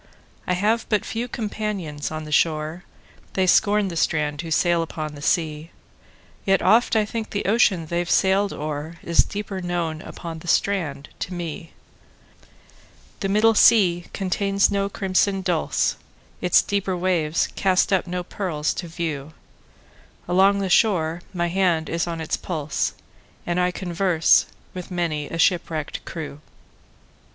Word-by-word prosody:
I 180 Hz, -, +2 dB
have 215 Hz, +5 st, +1 dB
but 210 Hz, -2 st, +1 dB
few 235 Hz, +2 st, -3 dB
companions 205 Hz, -10 st, -4 dB
on 155 Hz, 0 st, -5 dB
the 155 Hz, -, -9 dB
shore:They 160 Hz, +4 st, -2 dB
scorn 205 Hz, +2 st, +3 dB
the 170 Hz, -, -6 dB
strand 150 Hz, -2 st, 0 dB
who 165 Hz, -, -7 dB
sail 170 Hz, +1 st, +2 dB
upon 155 Hz, -2 st, -5 dB
the 145 Hz, -, -10 dB
sea; 155 Hz, 0 st, 0 dB, 0.7 s
Yet 195 Hz, -1 st, +3 dB
oft 230 Hz, +1 st, +4 dB
I 215 Hz, -1 st, +3 dB
think 225 Hz, +1 st, -4 dB
the 205 Hz, -, -3 dB
ocean 195 Hz, -5 st, +3 dB
they've 175 Hz, +2 st, -2 dB
sailed 195 Hz, +1 st, +3 dB
o'erIs 155 Hz, +3 st, -1 dB
deeper 200 Hz, -2 st, -5 dB
known 170 Hz, -3 st, -2 dB
upon 165 Hz, -2 st, -8 dB
the 175 Hz, -, -12 dB
strand 160 Hz, -8 st, 0 dB
to 180 Hz, -, -4 dB
me. 165 Hz, -1 st, -6 dB, 1.5 s
The 195 Hz, -, -2 dB
middle 215 Hz, +3 st, +4 dB
sea 180 Hz, -6 st, +5 dB
contains 195 Hz, +1 st, +1 dB
no 200 Hz, 0 st, 0 dB
crimson 195 Hz, 0 st, 0 dB
dulse, 175 Hz, -4 st, 0 dB, 0.4 s
Its 180 Hz, -1 st, +4 dB
deeper 195 Hz, -2 st, -1 dB
waves 170 Hz, -4 st, +1 dB
cast 190 Hz, 0 st, +2 dB
up 185 Hz, -1 st, +1 dB
no 180 Hz, 0 st, -3 dB
pearls 175 Hz, -5 st, -2 dB
to 175 Hz, -, -5 dB
view; 160 Hz, -3 st, -4 dB, 0.9 s
Along 190 Hz, +3 st, +4 dB
the 200 Hz, -1 st, -1 dB
shore 175 Hz, -6 st, +2 dB
my 175 Hz, -3 st, -1 dB
hand 175 Hz, -3 st, +1 dB
is 170 Hz, +1 st, -1 dB
on 165 Hz, -1 st, -4 dB
its 160 Hz, -, -2 dB
pulse, 155 Hz, -5 st, -2 dB, 0.5 s
And 175 Hz, +1 st, 0 dB
I 180 Hz, 0 st, +3 dB
converse 175 Hz, -2 st, +2 dB, 0.3 s
with 180 Hz, -1 st, -7 dB
many 165 Hz, -5 st, -2 dB
a 165 Hz, -, -4 dB
shipwrecked 165 Hz, -3 st, 0 dB
crew. 150 Hz, -4 st, -7 dB
175 Hz, 145 wpm, -23 LUFS, 160-195 Hz, 1.5 s, sea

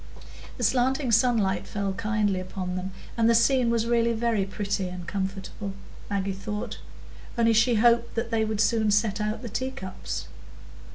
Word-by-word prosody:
The 245 Hz, -, -3 dB
slanting 255 Hz, +3 st, +2 dB
sunlight 215 Hz, -5 st, +2 dB
fell 200 Hz, -1 st, -2 dB
kindly 210 Hz, -2 st, 0 dB
upon 185 Hz, 0 st, -4 dB
them, 185 Hz, +1 st, -3 dB, 0.3 s
and 230 Hz, -1 st, +3 dB
the 230 Hz, -, +5 dB
scene 240 Hz, +1 st, +4 dB
was 230 Hz, -1 st, +1 dB
really 235 Hz, 0 st, +2 dB
very 225 Hz, -3 st, +1 dB
pretty 195 Hz, -1 st, -2 dB
and 180 Hz, -1 st, -7 dB
comfortable, 195 Hz, +1 st, -4 dB, 0.4 s
Maggie 200 Hz, -1 st, -1 dB
thought, 210 Hz, +2 st, -5 dB, 0.6 s
only 230 Hz, -1 st, +4 dB
she 230 Hz, +2 st, +4 dB
hoped 235 Hz, +1 st, +3 dB
they 230 Hz, -1 st, 0 dB
would 215 Hz, -1 st, 0 dB
soon 220 Hz, -1 st, +2 dB
set 210 Hz, 0 st, +2 dB
out 215 Hz, +3 st, -2 dB
the -, -, -4 dB
tea 255 Hz, +5 st, -2 dB
cups. 185 Hz, -, -6 dB
215 Hz, 160 wpm, -26 LUFS, 195-235 Hz, 0.6 s, the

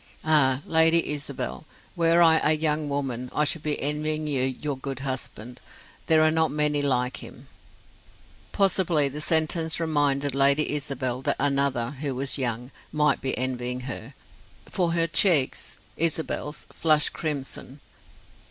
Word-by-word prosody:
Ah, 145 Hz, -3 st, +3 dB
Lady 165 Hz, +1 st, +3 dB
Isabel, 145 Hz, -1 st, -5 dB, 0.3 s
were 170 Hz, 0 st, +4 dB
I 160 Hz, -1 st, +5 dB
a 150 Hz, -, +4 dB
young 150 Hz, -1 st, 0 dB
woman, 130 Hz, -3 st, -3 dB
I 150 Hz, -, +2 dB
should 150 Hz, +1 st, 0 dB
be 150 Hz, -1 st, -2 dB
envying 155 Hz, +1 st, -2 dB
you 140 Hz, -4 st, 0 dB
your 135 Hz, +2 st, -3 dB
good 135 Hz, 0 st, -6 dB
husband; 125 Hz, -3 st, -5 dB, 0.5 s
there 160 Hz, -1 st, +5 dB
are 155 Hz, -, +4 dB
not 160 Hz, 0 st, +1 dB
many 150 Hz, 0 st, 0 dB
like 125 Hz, -3 st, 0 dB
him." -, -, -10 dB, 1.1 s
Possibly 180 Hz, -7 st, +2 dB
the 150 Hz, +3 st, -6 dB
sentence 160 Hz, +1 st, +1 dB
reminded 145 Hz, -4 st, 0 dB
Lady 140 Hz, +2 st, +2 dB
Isabel 135 Hz, -3 st, -2 dB
that -, -, +1 dB
another, 140 Hz, -4 st, 0 dB
who 140 Hz, -1 st, -4 dB
was 135 Hz, +2 st, 0 dB
young, 125 Hz, 0 st, -3 dB, 0.2 s
might 150 Hz, -3 st, +1 dB
be 130 Hz, -, -1 dB
envying 125 Hz, -1 st, -2 dB
her, 130 Hz, 0 st, -7 dB, 0.5 s
for 175 Hz, -3 st, -1 dB
her 165 Hz, -1 st, +2 dB
cheeks 165 Hz, -, +2 dB, 0.2 s
Isabel's 160 Hz, -2 st, -2 dB
flushed 155 Hz, -2 st, +2 dB
crimson. 140 Hz, -2 st, -5 dB
145 Hz, 140 wpm, -25 LUFS, 130-155 Hz, 1.1 s, I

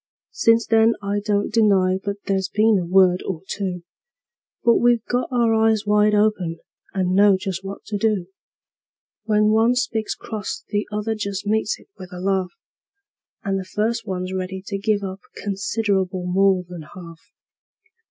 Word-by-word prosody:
Since 230 Hz, 0 st, +3 dB
then 225 Hz, 0 st, +4 dB
I 200 Hz, +1 st, -1 dB
don't 205 Hz, 0 st, 0 dB
deny 195 Hz, -4 st, +3 dB
but 200 Hz, -1 st, -2 dB
there's 195 Hz, -1 st, 0 dB
been 215 Hz, -1 st, +3 dB
a 175 Hz, -, -4 dB
word 185 Hz, 0 st, +4 dB
or 180 Hz, -5 st, -4 dB
two; 185 Hz, -3 st, -4 dB, 0.8 s
But 235 Hz, -1 st, +5 dB
we've 240 Hz, -2 st, +2 dB
got 245 Hz, +1 st, -1 dB
our 235 Hz, -2 st, +2 dB
eyes 220 Hz, -1 st, +2 dB
wide 210 Hz, 0 st, +3 dB
open, 205 Hz, -6 st, +1 dB, 0.3 s
and 185 Hz, -1 st, 0 dB
know 200 Hz, 0 st, +5 dB
just 190 Hz, 0 st, -4 dB
what 195 Hz, +1 st, -7 dB
to 205 Hz, -2 st, -3 dB
do: 210 Hz, -4 st, +1 dB, 1.0 s
When 210 Hz, -1 st, +3 dB
one 225 Hz, +3 st, +3 dB
speaks 220 Hz, -3 st, -1 dB
cross 215 Hz, -3 st, -6 dB
the 205 Hz, 0 st, -2 dB
other 210 Hz, +1 st, -2 dB
just 200 Hz, -2 st, -4 dB
meets 215 Hz, +1 st, 0 dB
it -, -, -19 dB
with 185 Hz, -1 st, -10 dB
a 180 Hz, -, -7 dB
laugh, 190 Hz, -1 st, 0 dB, 0.9 s
And 195 Hz, -1 st, -1 dB
the -, -, -4 dB
first 220 Hz, +4 st, -2 dB
one's 185 Hz, -1 st, -3 dB
ready 190 Hz, 0 st, -4 dB
to 200 Hz, -, -3 dB
give 205 Hz, 0 st, 0 dB
up 190 Hz, 0 st, -5 dB, 0.2 s
considerable 195 Hz, -2 st, -1 dB
more 190 Hz, 0 st, +2 dB
than 175 Hz, -2 st, -8 dB
half. 170 Hz, -3 st, -11 dB
200 Hz, 160 wpm, -22 LUFS, 185-220 Hz, 1.0 s, But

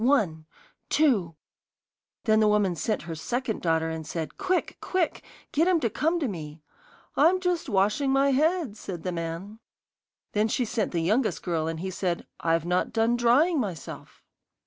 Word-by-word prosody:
One 185 Hz, -, +2 dB, 0.4 s
two 210 Hz, -, +2 dB, 0.4 s
' -, -, -67 dB
Then 215 Hz, -2 st, +4 dB
the 215 Hz, -, +4 dB
woman 205 Hz, -4 st, +2 dB
sent 215 Hz, +6 st, -1 dB
her 165 Hz, -, -5 dB
second 235 Hz, +8 st, -3 dB
daughter 160 Hz, -1 st, +1 dB
and 160 Hz, 0 st, -4 dB
said: 160 Hz, -2 st, -4 dB
'Quick, 370 Hz, -2 st, -1 dB
quick, 365 Hz, -3 st, -1 dB, 0.3 s
get 320 Hz, +4 st, +2 dB
him 365 Hz, -2 st, +4 dB
to 230 Hz, -7 st, 0 dB
come 325 Hz, -, +1 dB
to 290 Hz, -, 0 dB
me.' 155 Hz, -6 st, -7 dB, 0.5 s
'I'm 340 Hz, +6 st, +4 dB
just 360 Hz, -5 st, -1 dB
washing 210 Hz, +7 st, +2 dB
my 275 Hz, +1 st, +3 dB
head,' 305 Hz, -, +1 dB
said 180 Hz, -6 st, -7 dB
the 180 Hz, -, -2 dB
man. 170 Hz, +5 st, -5 dB, 0.7 s
Then 210 Hz, +1 st, +2 dB
she 245 Hz, +3 st, 0 dB
sent 225 Hz, -1 st, -1 dB
the 170 Hz, -, 0 dB
youngest 215 Hz, +7 st, +1 dB
girl, 165 Hz, -3 st, -1 dB
and 165 Hz, 0 st, -3 dB
he 190 Hz, 0 st, -3 dB
said: 180 Hz, -2 st, -2 dB
'I've 165 Hz, 0 st, +1 dB
not 180 Hz, +1 st, 0 dB
done 225 Hz, +1 st, +2 dB
drying 270 Hz, +8 st, +4 dB
myself. 190 Hz, -, -6 dB
215 Hz, 170 wpm, -27 LUFS, 170-275 Hz, 0.7 s, Then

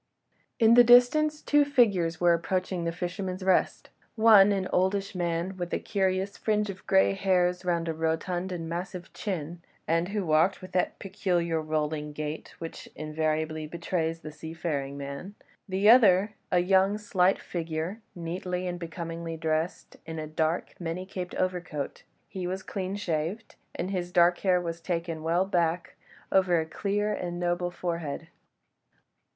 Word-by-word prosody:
In 225 Hz, -1 st, +6 dB
the 245 Hz, +1 st, +9 dB
distance 275 Hz, +6 st, +5 dB
two 295 Hz, 0 st, +4 dB
figures 200 Hz, -, +2 dB
were 175 Hz, -1 st, +5 dB
approaching 180 Hz, +1 st, -1 dB
"The 170 Hz, -, 0 dB
Fisherman's 180 Hz, +2 st, -4 dB
Rest": 190 Hz, -1 st, +1 dB, 0.2 s
one, 215 Hz, -3 st, +7 dB
an 195 Hz, -2 st, 0 dB
oldish 195 Hz, +2 st, +1 dB
man, 175 Hz, +1 st, -2 dB
with 175 Hz, -1 st, -4 dB
a -, -, -1 dB
curious 190 Hz, 0 st, -1 dB
fringe 210 Hz, -2 st, 0 dB
of 190 Hz, -, -14 dB
grey 100 Hz, +1 st, +4 dB
hairs 180 Hz, -, +1 dB
round 170 Hz, -2 st, 0 dB
a 165 Hz, -, -1 dB
rotund 165 Hz, +3 st, -2 dB
and 165 Hz, -2 st, -4 dB
massive 175 Hz, +2 st, -5 dB
chin, 175 Hz, -4 st, -4 dB, 0.3 s
and 165 Hz, +2 st, +1 dB
who 205 Hz, -2 st, -2 dB
walked 160 Hz, +4 st, +3 dB
with 185 Hz, -, -11 dB
that 180 Hz, -, 0 dB
peculiar 175 Hz, -4 st, -1 dB
rolling 155 Hz, -1 st, -2 dB
gait 150 Hz, +1 st, -5 dB
which 165 Hz, -1 st, -8 dB
invariably 155 Hz, 0 st, -2 dB
betrays 165 Hz, 0 st, -2 dB
the 155 Hz, -1 st, -7 dB
seafaring 150 Hz, -3 st, -4 dB
man: 140 Hz, +8 st, -7 dB, 0.3 s
the 190 Hz, +2 st, +1 dB
other, 210 Hz, -4 st, +6 dB, 0.2 s
a 180 Hz, -, +3 dB
young, 190 Hz, +2 st, +3 dB
slight 195 Hz, -2 st, +2 dB
figure, 170 Hz, +4 st, -4 dB
neatly 180 Hz, +1 st, -3 dB
and 175 Hz, -1 st, -3 dB
becomingly 165 Hz, -1 st, -5 dB
dressed 160 Hz, +1 st, -2 dB
in 160 Hz, 0 st, -5 dB
a 155 Hz, -, -3 dB
dark, 155 Hz, +2 st, -1 dB
many 175 Hz, +1 st, -4 dB
caped 185 Hz, -1 st, -6 dB
overcoat; 175 Hz, -6 st, -3 dB, 0.3 s
he 185 Hz, -3 st, -5 dB
was 190 Hz, +1 st, -4 dB
clean 190 Hz, -1 st, -4 dB
shaved, 180 Hz, +3 st, -3 dB, 0.2 s
and 185 Hz, +3 st, -3 dB
his 180 Hz, -2 st, -3 dB
dark 175 Hz, 0 st, +4 dB
hair 185 Hz, -2 st, +3 dB
was 170 Hz, -1 st, -5 dB
taken 165 Hz, -2 st, -3 dB
well 170 Hz, +4 st, +1 dB
back 175 Hz, -2 st, 0 dB, 0.4 s
over 185 Hz, -3 st, +4 dB
a 160 Hz, -, -1 dB
clear 205 Hz, +5 st, -1 dB
and 175 Hz, -1 st, -4 dB
noble 175 Hz, 0 st, 0 dB
forehead. 170 Hz, -3 st, -4 dB
175 Hz, 155 wpm, -28 LUFS, 165-190 Hz, 0.4 s, the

